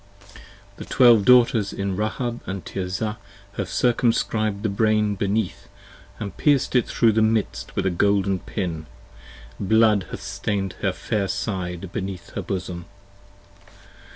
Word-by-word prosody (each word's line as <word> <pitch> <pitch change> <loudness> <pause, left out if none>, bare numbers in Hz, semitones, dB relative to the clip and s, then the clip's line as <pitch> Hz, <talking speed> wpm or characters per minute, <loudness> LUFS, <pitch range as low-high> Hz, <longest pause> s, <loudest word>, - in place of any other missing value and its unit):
The - - -8
Twelve 120 -5 +5
Daughters 120 -5 +5
in 100 -1 -3
Rahab 120 +4 -2 0.2
& - - -28
Tirzah 100 +4 -3 0.4
have 100 - -2
circumscrib'd 115 -3 +1
the - - +2
Brain 105 0 +2
Beneath 100 0 -2 0.3
& 100 -4 -9
pierced 140 -3 +2
it 125 - +3
thro' 115 -2 +3
the 110 +1 +2
midst 110 - 0
with - - -1
a 95 - +2
golden 100 +1 +1
pin. 85 -7 -4 0.7
Blood 110 -1 +3
hath - - -7
stain'd 95 -2 -2
her - - +1
fair 100 -2 -2
side 95 -2 -4
beneath 95 -2 -5
her - - -4
bosom. 90 -2 -5
100 Hz, 130 wpm, -23 LUFS, 95-110 Hz, 0.7 s, Twelve